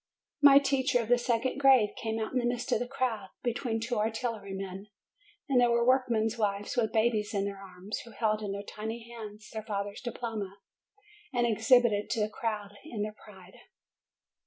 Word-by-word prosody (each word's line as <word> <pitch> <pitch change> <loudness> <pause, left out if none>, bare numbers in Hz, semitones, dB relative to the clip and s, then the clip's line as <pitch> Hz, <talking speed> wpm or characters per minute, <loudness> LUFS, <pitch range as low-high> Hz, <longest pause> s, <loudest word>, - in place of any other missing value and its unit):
My 280 -1 +9
teacher 270 -2 +2
of 230 -1 -3
the 245 0 +5
second 240 +2 0
grade 265 -6 +6
came 220 0 -2
out 220 +2 -3
in 255 - +2
the 240 - -1
midst 240 0 -2
of - - +3
the 245 - -3
crowd, 245 -6 -2 0.2
between 235 -1 -1
two 230 0 -2
artillery 220 -2 -2
men. 195 +1 -6 0.6
And 260 -4 +4
there 245 - +5
were 235 0 +3
work 255 0 +4
men's 225 0 0
wives 205 +3 -1
with 225 -3 +1
babies 220 -2 +1
in 200 0 +1
their 200 -1 -5
arms, 190 +2 -6
who 235 - -11
held 215 0 0
in 205 -2 -3
their 200 0 -4
tiny 220 +3 -6
hands 215 -2 -9
their 220 - -4
father's 205 -1 -4
diploma, 225 -5 -5 0.7
and 245 -2 +1
exhibited 225 -1 +4
it - - -24
to - - -2
the 210 - +1
crowd 210 -2 -3
in 235 -9 -4
their 210 0 -4
pride. 190 -3 -15
225 Hz, 195 wpm, -30 LUFS, 210-245 Hz, 0.7 s, My